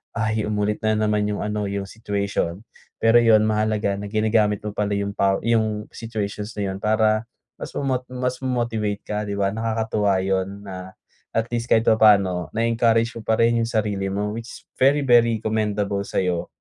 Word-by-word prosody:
ay 110 -1 0
umulit 105 0 -1
na 110 - +3
naman 105 -1 +1
yung 105 -1 -2
ano, 105 0 -2
yung 100 0 -3
situation. 100 -4 -2 0.4
Pero 115 +1 +5
yun, 115 -2 +5
mahalaga 110 -2 0
na 105 - -5
ginagamit 110 -1 +1
mo 105 - -3
pala 105 0 -1
yung 100 0 -2
paw 95 0 +2
yung 110 -2 +1
situations 105 -2 -5
na 100 -2 -2
yun 95 - -5
para 110 +1 +1 0.3
mas - - -7
mamot 130 -3 0
mas 125 0 -3
mo-motivate 115 -5 -2
ka, 105 - -4
'di 100 - -3
ba? 100 -1 +1
Nakakatuwa 110 -3 0
yun 95 +1 -2
na 95 -1 -8 0.4
at 115 - +2
least 120 0 -2
kahit 110 - +4
papaano, 100 -6 +4
na-encourage 115 0 +2
mo - - -8
pa 110 - +3
rin 115 0 +3
yung 115 - 0
sarili 105 -3 -1
mo. 105 +1 -1
Which 115 +2 -8 0.2
very 140 +3 +4
very 115 -3 +4
commendable 105 -2 -1
sa'yo 90 -2 -1
105 Hz, 175 wpm, -23 LUFS, 100-115 Hz, 0.4 s, Pero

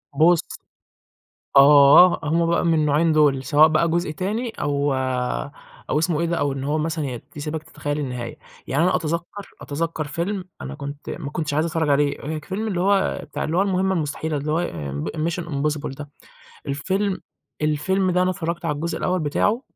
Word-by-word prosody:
بُص 165 +3 +5 1.2
آه، 145 +5 +8
هُم 165 +3 +1
بقى 170 +1 +1
من 165 -1 +3
النوعين 155 +1 +2
دُول، 145 -3 +3
سواء 155 +1 +6
بقى 160 +2 +2
جزء 170 -1 0
تاني 210 +9 -2
أو 145 -6 -1 1.0
أو 150 - +2
اسمه 165 -1 0
إيه 170 - +1
ده، 170 - -1
أو 145 -3 0
إن 135 0 -5
هو 150 +2 0
مثلًا 160 0 -2
ي 125 -3 -5
يسيبك 150 +2 -4
تتخيل 145 -1 -4
النهاية، 125 -4 -5 0.3
يعني 140 +5 +1
أنا 185 - +3
أتذكر 170 +5 -4
أتذكر 160 +2 -3
فيلم 180 +6 -3 0.2
أنا 140 - -6
كنت 145 0 -7
ما 145 -4 -5
كنتش 150 -3 -3
عايز 155 +3 +2
أتفرج 165 -2 -1
عليه، 145 0 +2
اللي 180 +6 -3
هو 195 +1 +2
ك - - -25
فيلم 160 +3 -1
المهمة 190 -1 +1
المستحيلة، 155 -1 -2
اللي 150 +2 -2
هو 170 +2 +1 0.4
د 155 - -2
mission 170 0 -4
impossible 150 -2 -2
ده، 145 0 -9 0.6
الفيلم 190 +8 -1 0.4
الفيلم 185 +6 +1
ده 180 +1 +2
أنا 185 0 +2
اتفرجت 170 -2 -4
على 150 - 0
الجزء 165 +4 -3
الأول 180 0 0
بتاعه، 205 - +1
155 Hz, 175 wpm, -22 LUFS, 145-175 Hz, 1.2 s, آه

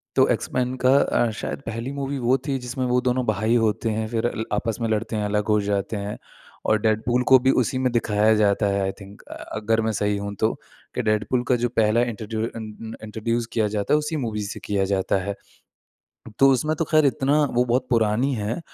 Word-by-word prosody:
तो - - +5
एक्स-मेन 125 0 -2
का 130 +1 +5
अ, 120 -4 +2
शायद - - -4
पहली 115 +3 -4
मूवी 140 +1 -3
वो 130 +2 +4
थी 135 -2 0
जिसमें 125 +1 -3
वो 125 0 +2
दोनों 125 0 0
भाई 110 +2 +1
होते 110 +1 0
हैं। 110 0 -2
फिर 115 +1 0
ल 110 - -2
आपस 110 +1 -1
में 115 - 0
लड़ते 110 +1 -1
हैं 105 -1 -1
अलग 105 +1 -1
हो - - +3
जाते 100 +1 -2
हैं 100 +1 -5 0.5
और 110 - +3
डेडपूल 115 +3 +1
को 130 - +8
भी 130 +2 +3
उसी 130 +2 -1
में 130 -1 +1
दिखाया 110 -2 +2
जाता 105 0 +2
है 100 0 0
आई 95 - 0
थिंक 100 +1 -12
अ, - - -11
अगर 110 +1 -2
मैं 110 - 0
सही 105 0 +1
हूँ 100 0 -5
तो 110 +1 +2 0.4
कि - - 0
डेडपूल 110 +3 0
का 125 - +3
जो 120 0 0
पहला 110 0 +2
इंट्रोड्यू 110 -2 -3
अ - - -6
न 110 0 -8
अ, - - -14
इंट्रोड्यूस 115 +2 -2
किया 110 -2 +2
जाता 100 - 0
है - - +6
उसी 150 +1 -2
मूवी 105 -2 -3
से 100 - -6
किया 100 -1 0
जाता 95 0 +1
है। 100 +1 -3 1.0
तो 135 - +7
उसमें 150 +5 +1
तो 165 - 0
ख़ैर 155 0 +3
इतना 140 +2 +2
वो 120 +1 +3
बहुत 125 +1 +1
पुरानी 115 +3 +2
है 110 +4 -3
115 Hz, 225 wpm, -23 LUFS, 105-125 Hz, 1.0 s, को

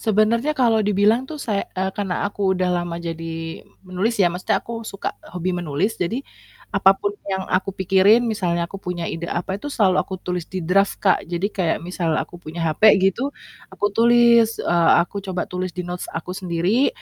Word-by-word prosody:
Sebenarnya 230 +7 +2
kalau 230 -4 +3
dibilang 210 +5 +2
tuh 315 - -6
say 215 -8 -2
eee, 190 +1 0
karena 195 -3 -2
aku 195 -2 0
udah 185 0 0
lama 170 -1 -5
jadi 165 -1 -5 0.2
menulis 190 +6 -1
ya, 195 - +4
maksudnya 180 +1 0
aku 230 -1 -6
suka 195 - -4 0.2
hobi 180 +1 -2
menulis 175 +4 -2
jadi, 230 +10 -2 0.5
apa 195 -1 +5
pun 205 - -2 0.2
yang 190 -1 -2
aku 185 +1 +1
pikirin 195 +5 +4
misalnya 180 -7 0
aku 190 +3 -8
punya 180 -2 -4
ide 170 +1 -4
apa 190 +3 -3
itu 290 - -5
selalu 200 -9 +2
aku 190 - -4
tulis 180 -2 -4
di 185 -2 -4
draft 195 +4 +2
Kak, 190 - +4
jadi 175 +2 -1
kayak 175 -4 0
misal 170 -3 -1
aku 175 - -5
punya 165 +1 -5
hape 165 +7 +4
gitu, 195 +8 +1 0.4
aku 205 - -2
tulis, 235 0 +5
eee, 170 -1 +2
aku 180 +4 -3
coba 190 -2 -3
tulis 185 0 -4
di 180 - -3
notes 175 0 -5
aku 165 +3 -5
sendiri, 185 +7 +1
190 Hz, 185 wpm, -22 LUFS, 175-210 Hz, 0.5 s, apa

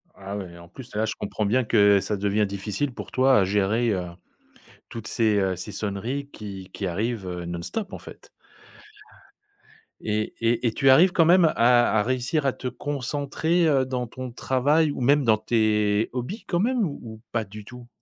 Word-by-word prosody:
Ah 100 +1 -7
ouais 95 -3 -7
et - - -13
en 85 0 -13
plus 120 +5 -12
là, 110 +1 +1
je 110 - -2
comprends 105 +1 -3
bien 125 +5 +2
que 100 -3 +4
ça 100 +2 -3
devient 105 +1 +1
difficile 100 +7 -3
pour - - -9
toi 130 -2 +4
à - - +3
gérer, 105 +4 +1
heu, 90 -2 -3 0.8
toutes 115 -2 -7
ces, 110 -3 +1
heu, 95 -1 0
ces 90 +4 -6
sonneries 110 +9 -4
qui 100 -5 -9
qui 95 - -3
arrivent, 105 +2 -3
heu, 90 -1 -5
non-stop 85 - -4
en - - -6
fait. - - -13 1.7
Et 110 0 -2
et 115 +1 +1
et - - +1
tu 135 - +3
arrives 175 +7 +6
quand 165 -3 +3
même 175 +1 +6
à 120 -5 +4
à - - +2
réussir 130 +5 -1
à 135 - +2
te 130 - -6
concentrer, 145 +5 -1
heu, 135 -3 +3
dans 125 -1 -3
ton 130 +1 -8
travail 145 +5 +1
ou 130 - -6
même 140 +3 +3
dans 110 -2 +4
tes 105 -1 +1
hobbies 130 - -5
quand 175 - -1
même 240 +2 +1
ou 145 -3 -5
ou 110 -2 -9
pas 115 -1 -1
du 105 +1 -11
tout? 125 0 -12
115 Hz, 195 wpm, -24 LUFS, 100-135 Hz, 1.7 s, arrives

